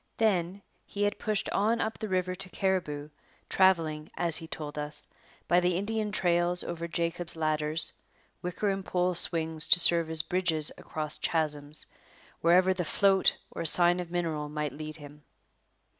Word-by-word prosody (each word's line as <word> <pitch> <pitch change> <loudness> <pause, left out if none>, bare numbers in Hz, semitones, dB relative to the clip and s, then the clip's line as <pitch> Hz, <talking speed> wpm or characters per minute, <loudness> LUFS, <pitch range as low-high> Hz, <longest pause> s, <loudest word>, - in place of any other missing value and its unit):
Then, 195 -3 0 0.2
he 205 - -3
had 205 - -1
pushed 215 -2 -1
on 220 +4 +1
up 220 - -3
the 215 - -4
river 185 -1 -1
to 185 0 -7
Cariboo, 160 -7 -2 0.4
travelling, 165 -5 +2
as 170 -2 0
he 165 - -5
told 150 -2 -7
us, 150 0 -5 0.4
by 175 - +4
the 180 -1 0
Indian 215 +2 -2
trails 175 -2 +2
over 170 0 -5
'Jacob's 170 0 -3
ladders' 155 0 -1 0.5
wicker 180 +3 -2
and 195 0 -4
pole 180 0 0
swings 160 -2 +3
to 175 - +6
serve 170 -1 +7
as 160 -2 +3
bridges 175 -5 -1
across 155 -1 -5
chasms 150 -2 -1 0.6
wherever 180 +3 +4
the 180 -1 -3
'float' 195 +3 +2
or - - -5
sign 175 +2 +4
of 175 -1 -5
mineral 165 -4 -3
might 150 0 -4
lead 155 +1 -8
him. 145 0 -13
170 Hz, 160 wpm, -28 LUFS, 155-185 Hz, 0.6 s, serve